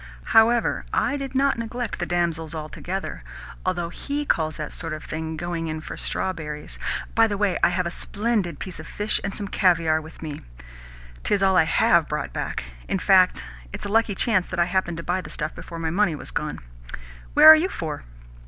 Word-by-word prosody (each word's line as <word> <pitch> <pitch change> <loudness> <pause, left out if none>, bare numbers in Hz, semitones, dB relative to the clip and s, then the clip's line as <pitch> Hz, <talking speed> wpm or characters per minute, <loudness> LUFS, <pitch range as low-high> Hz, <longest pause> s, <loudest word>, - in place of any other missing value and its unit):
However, 230 +1 +4
I 285 - +1
did 275 -2 -5
not 270 -2 +2
neglect 230 -1 -4
the 175 - -2
damsels 170 -2 0
altogether 175 +5 -5 0.4
although 175 -2 -1
HE 290 +11 -4
calls 155 - 0
that 150 -1 -5
sort 165 -2 -4
of 155 - -6
thing 160 0 -5
'going 170 -1 -3
in 155 0 -3
for 155 - -7
strawberries.' 150 -5 -3 0.3
By 225 0 +5
the 205 -2 -2
way, 200 -2 +1
I - - +5
have 180 +1 0
a 170 - -2
splendid 205 -5 -1
piece 185 -4 -6
of 155 - -9
fish 210 +1 -1
and 200 - -3
some 205 - -4
caviare 165 -5 +2
with 160 +1 -12
me. 150 -2 -6 0.8
'Tis 200 -1 +1
all 190 -1 +4
I 170 - +5
HAVE 165 0 +3
brought 150 -1 -3
back! - - -3 0.2
In - - 0
fact 65 - +4 0.3
it - - -6
is - - -4
a - - -3
lucky 220 -1 +2
chance 190 -3 +2
that - - -4
I 175 - +5
happened 180 -2 -1
to 170 - -5
buy 180 +2 -1
the - - -10
stuff 155 0 -3
before 170 - -9
my 165 -1 -2
money 175 -3 +2
was 140 - -7
gone. - - -3 0.8
Where 300 +1 +8
are 315 - +13
you 335 +4 +1
for?" 155 - -5
175 Hz, 205 wpm, -24 LUFS, 160-210 Hz, 0.8 s, are